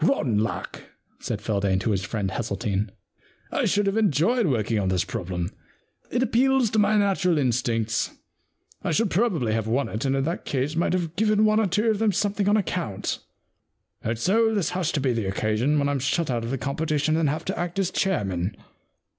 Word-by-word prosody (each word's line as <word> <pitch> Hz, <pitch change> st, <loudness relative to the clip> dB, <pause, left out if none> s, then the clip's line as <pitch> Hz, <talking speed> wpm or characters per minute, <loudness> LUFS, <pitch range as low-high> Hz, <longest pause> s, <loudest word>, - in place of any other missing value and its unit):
* -, -, +1 dB
Rotten 140 Hz, -, +2 dB
luck,* 110 Hz, +1 st, -3 dB, 0.4 s
said -, -, -4 dB
Feldane, 100 Hz, -2 st, +1 dB
to 110 Hz, -, 0 dB
his 95 Hz, -2 st, 0 dB
friend, 100 Hz, -2 st, -2 dB
Hesseltine. 100 Hz, -1 st, -2 dB, 0.3 s
* -, -, -33 dB
I -, -, 0 dB
should 205 Hz, 0 st, +2 dB
have 200 Hz, +2 st, 0 dB
enjoyed 210 Hz, -, +2 dB
working 115 Hz, -5 st, +1 dB
on 95 Hz, -, 0 dB
this 95 Hz, -2 st, +1 dB
problem. 90 Hz, -5 st, -4 dB, 0.6 s
It 245 Hz, +2 st, +1 dB
appeals 260 Hz, -1 st, +3 dB
to 220 Hz, -, +2 dB
my 210 Hz, +1 st, +4 dB
natural 190 Hz, -4 st, +2 dB
instincts. 115 Hz, -4 st, 0 dB, 0.7 s
I -, -, -1 dB
should 215 Hz, +3 st, +1 dB
probably 170 Hz, -, +1 dB
have 110 Hz, -1 st, -1 dB
won 120 Hz, +2 st, 0 dB
it, 110 Hz, -, -4 dB
and 135 Hz, -1 st, +1 dB
in 135 Hz, -, +1 dB
that 170 Hz, +5 st, -2 dB
case 140 Hz, +3 st, -1 dB
might 170 Hz, +2 st, +1 dB
have 175 Hz, -3 st, -2 dB
given 215 Hz, +1 st, +3 dB
one 215 Hz, 0 st, +4 dB
or 220 Hz, -, +2 dB
two 210 Hz, +5 st, +2 dB
of 210 Hz, -, -1 dB
them 220 Hz, -2 st, +2 dB
something 205 Hz, +1 st, 0 dB
on 210 Hz, -, +4 dB
account. 170 Hz, -, -2 dB, 0.8 s
And 115 Hz, +1 st, -2 dB
so 220 Hz, -, +2 dB
this 200 Hz, -5 st, 0 dB
has 180 Hz, -3 st, -1 dB
to 150 Hz, -, +1 dB
be 130 Hz, -2 st, +1 dB
the 115 Hz, -3 st, -1 dB
occasion 110 Hz, +9 st, +1 dB
when 140 Hz, -1 st, +2 dB
I'm 145 Hz, -1 st, 0 dB
shut 145 Hz, +3 st, 0 dB
out 120 Hz, -2 st, -1 dB
of 115 Hz, -, -4 dB
the 135 Hz, -, -1 dB
competition 150 Hz, +4 st, 0 dB
and 160 Hz, -3 st, +2 dB
have 150 Hz, +3 st, -3 dB
to -, -, -3 dB
act 175 Hz, +1 st, -3 dB
as 190 Hz, -2 st, +1 dB
chairman.' 100 Hz, -, -1 dB
150 Hz, 205 wpm, -25 LUFS, -, 0.8 s, my